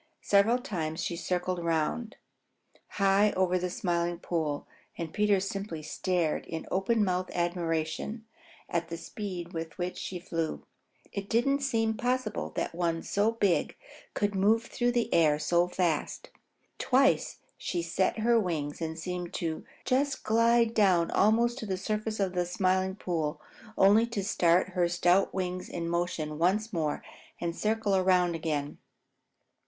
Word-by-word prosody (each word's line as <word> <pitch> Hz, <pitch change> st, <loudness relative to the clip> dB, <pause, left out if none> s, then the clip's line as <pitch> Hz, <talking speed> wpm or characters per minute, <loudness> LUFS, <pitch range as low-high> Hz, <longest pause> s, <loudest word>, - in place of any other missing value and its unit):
Several 205 Hz, +4 st, +4 dB
times 170 Hz, -, -3 dB
she 170 Hz, -, -2 dB
circled 180 Hz, +1 st, -2 dB
around, 170 Hz, -, -1 dB, 0.7 s
high 200 Hz, +1 st, +3 dB
over 185 Hz, -1 st, +2 dB
the 180 Hz, 0 st, -2 dB
Smiling 175 Hz, -4 st, -1 dB
Pool, 160 Hz, -4 st, -2 dB, 0.3 s
and 165 Hz, -2 st, -5 dB
Peter 210 Hz, -2 st, +3 dB
simply 195 Hz, -4 st, -4 dB
stared 175 Hz, -1 st, -1 dB
in 160 Hz, -1 st, -5 dB
open 210 Hz, +4 st, +2 dB
mouthed 185 Hz, 0 st, -1 dB
admiration 170 Hz, +4 st, -2 dB, 0.4 s
at 170 Hz, -1 st, -1 dB
the 170 Hz, -, -5 dB
speed 180 Hz, -1 st, -6 dB
with 165 Hz, -1 st, -5 dB
which 180 Hz, 0 st, -3 dB
she 185 Hz, -, -4 dB
flew. 165 Hz, -2 st, -3 dB, 0.5 s
It 200 Hz, 0 st, -5 dB
didn't 275 Hz, +5 st, +2 dB
seem 225 Hz, -5 st, +1 dB
possible 245 Hz, -1 st, -1 dB
that -, -, -2 dB
one 165 Hz, -1 st, -1 dB
so 210 Hz, +3 st, +1 dB
big 200 Hz, -6 st, +1 dB, 0.4 s
could 205 Hz, 0 st, 0 dB
move 210 Hz, +4 st, +3 dB
through 245 Hz, +1 st, -1 dB
the 240 Hz, -1 st, 0 dB
air 155 Hz, -3 st, +4 dB
so 170 Hz, +3 st, +2 dB
fast. 175 Hz, -4 st, -1 dB, 0.5 s
Twice 270 Hz, +1 st, +2 dB, 0.2 s
she 175 Hz, -2 st, -3 dB
set 175 Hz, +5 st, 0 dB
her 235 Hz, +1 st, +4 dB
wings 160 Hz, -6 st, -2 dB
and 160 Hz, 0 st, -3 dB
seemed 180 Hz, +1 st, -4 dB
to 160 Hz, -2 st, -3 dB, 0.2 s
just 275 Hz, +2 st, 0 dB
slide 230 Hz, +1 st, +3 dB
down 185 Hz, -6 st, +3 dB
almost 235 Hz, +4 st, +3 dB
to 220 Hz, -, -5 dB
the 190 Hz, -1 st, -1 dB
surface 215 Hz, +2 st, -2 dB
of 190 Hz, -2 st, 0 dB
the 180 Hz, -1 st, 0 dB
Smiling 185 Hz, 0 st, +1 dB
Pool, 160 Hz, -5 st, -2 dB, 0.4 s
only 210 Hz, +4 st, +5 dB
to 225 Hz, -4 st, -3 dB
start 180 Hz, -3 st, +3 dB
her 180 Hz, -2 st, +1 dB
stout 175 Hz, +2 st, +3 dB
wings 185 Hz, -1 st, -3 dB
in 170 Hz, -1 st, -4 dB
motion 170 Hz, -3 st, -2 dB
once 205 Hz, +6 st, +1 dB
more 155 Hz, -4 st, -1 dB, 0.4 s
and 170 Hz, -1 st, -2 dB
circle 215 Hz, -2 st, +1 dB
around 180 Hz, -2 st, +3 dB
again. 155 Hz, -3 st, -3 dB
185 Hz, 150 wpm, -29 LUFS, 170-215 Hz, 0.7 s, only